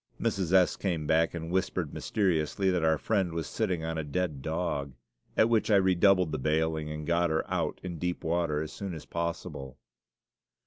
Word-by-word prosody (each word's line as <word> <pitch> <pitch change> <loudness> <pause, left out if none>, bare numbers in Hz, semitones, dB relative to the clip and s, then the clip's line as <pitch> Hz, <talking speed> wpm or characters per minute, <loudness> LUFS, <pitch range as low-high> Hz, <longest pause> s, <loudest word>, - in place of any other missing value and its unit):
Mrs. 95 -4 -1
S. 95 -2 +4
came 85 -6 -2
back 80 +2 +2
and 80 0 -5
whispered 95 -4 -1
mysteriously 95 -1 0
that 90 -3 0
our 80 -1 +3
Friend 95 0 0
was 80 0 -3
sitting 90 -7 -1
on 80 0 -2
a - - -2
dead 75 -1 -2
dog, 75 -3 -2 0.4
at 110 - +6
which 115 -1 +2
I 105 - +5
redoubled 95 -2 +4
the 75 - -2
bailing 80 +2 0
and 75 0 -5
got 85 +1 +2
her 80 0 0
out - - -1
in 85 -3 -5
deep 90 +1 -2
water 80 -2 0
as 80 - -8
soon 95 -4 -5
as 80 - -9
possible. 85 -6 -4
85 Hz, 185 wpm, -29 LUFS, 80-90 Hz, 0.4 s, at